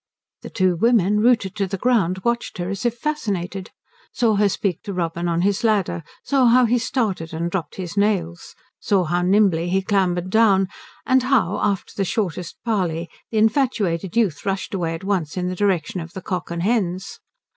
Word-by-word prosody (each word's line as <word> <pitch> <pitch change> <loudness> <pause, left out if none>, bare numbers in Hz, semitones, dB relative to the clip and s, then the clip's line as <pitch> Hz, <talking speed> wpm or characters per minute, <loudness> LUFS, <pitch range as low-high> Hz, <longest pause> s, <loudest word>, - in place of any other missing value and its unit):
The - - -8
two 185 -3 +1
women, 210 -1 +3
rooted 220 -4 +2
to 200 -2 0
the 195 - -3
ground, 190 -5 +1
watched 235 0 -1
her 175 0 -3
as 200 +5 -1
if 240 0 -3
fascinated, 200 - -3 0.4
saw 230 -3 +2
her 205 0 +3
speak 190 -1 -2
to 200 - -6
Robin 170 -1 -2
on 170 0 0
his 200 +4 +1
ladder, 205 -6 +1 0.2
saw 270 -3 +3
how 250 +2 +5
he 240 +2 +2
started 210 - -2
and 170 +1 -2
dropped 180 -4 -3
his 185 -1 -6
nails, 190 -5 -1 0.2
saw 195 -3 +2
how 175 +2 0
nimbly 180 -3 +3
he 190 +1 +1
clambered 185 -2 0
down, 195 -4 +4 0.4
and 260 0 +4
how 250 -8 +1
after 200 -2 -1
the 200 - 0
shortest 180 -3 -3
parley 175 -7 -1 0.2
the 220 - -3
infatuated 215 - +1
youth 195 -11 +1
rushed 195 0 -3
away 170 -4 -1
at 165 - -9
once 185 -5 -1
in 180 0 -1
the 185 - -3
direction 185 -3 0
of 165 +1 -9
the 190 - -6
Cock 180 -2 -3
and 170 0 -3
Hens. 190 -4 -1
195 Hz, 190 wpm, -22 LUFS, 175-220 Hz, 0.4 s, how